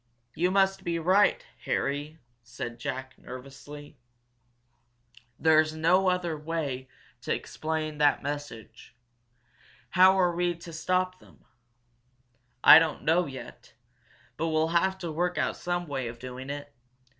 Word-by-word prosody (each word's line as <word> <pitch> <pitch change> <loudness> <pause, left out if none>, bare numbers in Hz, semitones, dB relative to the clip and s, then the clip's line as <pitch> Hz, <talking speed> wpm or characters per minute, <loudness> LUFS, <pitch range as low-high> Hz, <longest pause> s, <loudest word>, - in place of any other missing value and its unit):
"You 180 +2 +1
must 195 0 +2
be 170 -2 -1
right, 190 +5 +3 0.2
Harry!" 145 +3 -2 0.2
said 120 0 -7
Jack, 130 +2 -5
nervously. 140 +2 -11 1.4
"There's 155 0 +3
no 180 +4 +3
other 180 -3 -1
way 150 -4 -4 0.3
to - - -4
explain 155 -1 -3
that 145 -1 +3
message. 140 -7 -7 1.0
How 185 +1 +6
are 175 -2 +2
we 175 0 +1
going 170 - -17
to 170 - -9
stop 185 +3 -1
them?" 75 - -21 1.2
"I - - +11
don't 165 -2 -2
know 170 +3 +2
yet, 130 -2 -11 0.6
but 165 - -1
we'll 160 0 +1
have 190 +3 +1
to 175 -4 -5
work 175 +3 -1
out - - 0
some 175 0 -3
way 135 -4 -3
of 115 0 -7
doing 130 +2 -8
it. 145 0 -6
155 Hz, 135 wpm, -28 LUFS, 140-175 Hz, 1.4 s, I